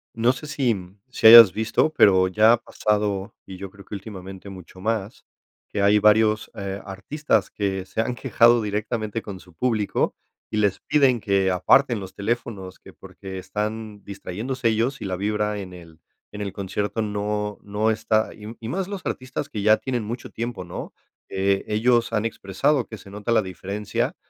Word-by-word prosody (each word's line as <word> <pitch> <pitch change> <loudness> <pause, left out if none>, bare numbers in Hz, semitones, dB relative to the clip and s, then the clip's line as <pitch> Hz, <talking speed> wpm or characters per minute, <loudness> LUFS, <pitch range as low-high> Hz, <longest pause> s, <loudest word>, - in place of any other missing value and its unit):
No 115 +2 +3
sé 130 +4 -8
si, 130 -6 0
mm, 95 +2 -11
si 120 - -5
hayas 115 -3 +11
visto, 110 +7 +1
pero 95 -9 +5
ya 110 +5 +5
ha - - +3
pasado, 105 -3 -1
y 95 -1 -8
yo 95 0 -8
creo 100 0 -14
que 105 - -8
últimamente 95 -1 -9
mucho 95 -1 -12
más, 110 0 -3 0.4
que 100 - -2
hay 100 +1 +5
varios, 105 +1 +3
eh, 100 -2 -5
artistas 100 +11 -1
que 95 -2 -2
se - - -6
han 120 +2 0
quejado 120 -2 +4
directamente 110 +1 -3
con 95 -3 -7
su 90 -3 -19
público 110 -2 0 0.4
y 110 - -2
les 100 -3 +1
piden 135 -5 +3
que 100 -2 +1
aparten 115 +6 +3
los 95 -1 -9
teléfonos, 100 -3 -4
que - - -15
porque 95 -1 -9
están 105 +2 -5
distrayéndose 110 +6 -4
ellos 115 +5 0
y - - -4
la 95 -1 -2
vibra 105 +1 -1
en 90 -2 -8
el 85 -2 -14 0.3
en 105 0 -7
el 100 -2 -3
concierto, 100 +3 -3
no 105 0 -2
no 105 +2 0
está 110 0 0
y 110 +2 -9
y 115 0 -6
más 190 +3 -2
los 200 -2 -5
artistas 130 0 -4
que 105 -2 -4
ya 110 +1 +6
tienen 125 -4 -3
mucho 120 +4 -6
tiempo, 120 0 -5
¿no?, - - -7 0.4
eh, 95 0 +1
ellos 115 +2 +2
han 105 0 0
expresado 115 +6 0
que 110 - -9
se 100 - -14
nota 105 +3 -4
la 115 - +4
diferencia 100 +2 -3
105 Hz, 185 wpm, -23 LUFS, 100-115 Hz, 0.4 s, hayas